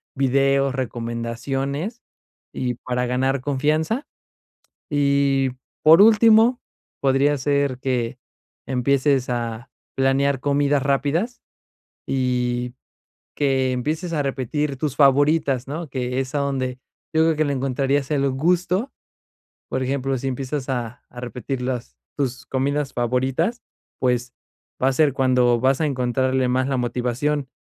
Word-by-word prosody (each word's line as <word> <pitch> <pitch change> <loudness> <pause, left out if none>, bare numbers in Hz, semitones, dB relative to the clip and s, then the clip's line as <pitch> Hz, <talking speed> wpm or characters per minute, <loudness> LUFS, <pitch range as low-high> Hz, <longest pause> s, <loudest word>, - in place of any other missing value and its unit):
videos, 135 0 +2
recomendaciones 130 - -3 0.5
y 125 -1 -2
para 125 +1 -2
ganar 130 +2 0
confianza. 155 - 0 0.8
Y 140 -2 +2 0.3
por 160 +4 +8
último, 225 +3 +6 0.4
podría 140 +2 +3
ser 140 -1 0
que 125 -1 -2 0.5
empieces 135 +1 +1
a 120 -1 -3 0.3
planear 135 +1 +2
comidas 145 0 +1
rápidas 145 - 0 0.7
y 125 -2 -1 0.6
que 135 -2 +1
empieces 155 +7 -2
a 150 - +1
repetir 135 +1 -2
tus 145 -1 -2
favoritas, 140 -2 +3
¿no? 155 +1 -5
Que 125 0 -2
es 130 +1 -4
donde 135 -3 -1 0.3
yo 160 0 +3
creo 160 -2 +2
que 155 - +2
le 145 - 0
encontrarías 135 +1 0
el 140 -2 +1
gusto. 180 - 0 0.8
Por 130 - -2
ejemplo, 135 0 -1
si 135 - -3
empiezas 135 +1 -4
a 120 -3 -3
a 125 - -10
repetir 125 +1 -5
las 120 - -4 0.2
tus 130 -2 -3
comidas 140 +2 -1
favoritas, 130 - 0 0.4
pues, 125 -1 0 0.5
va 135 - +4
ser 145 0 +3
cuando 125 -2 +3
vas 135 +2 +2
a 155 - +2
encontrarle 130 0 0
más 130 +2 +1
la 135 - 0
motivación. 125 +3 -1
135 Hz, 120 wpm, -22 LUFS, 125-145 Hz, 0.8 s, por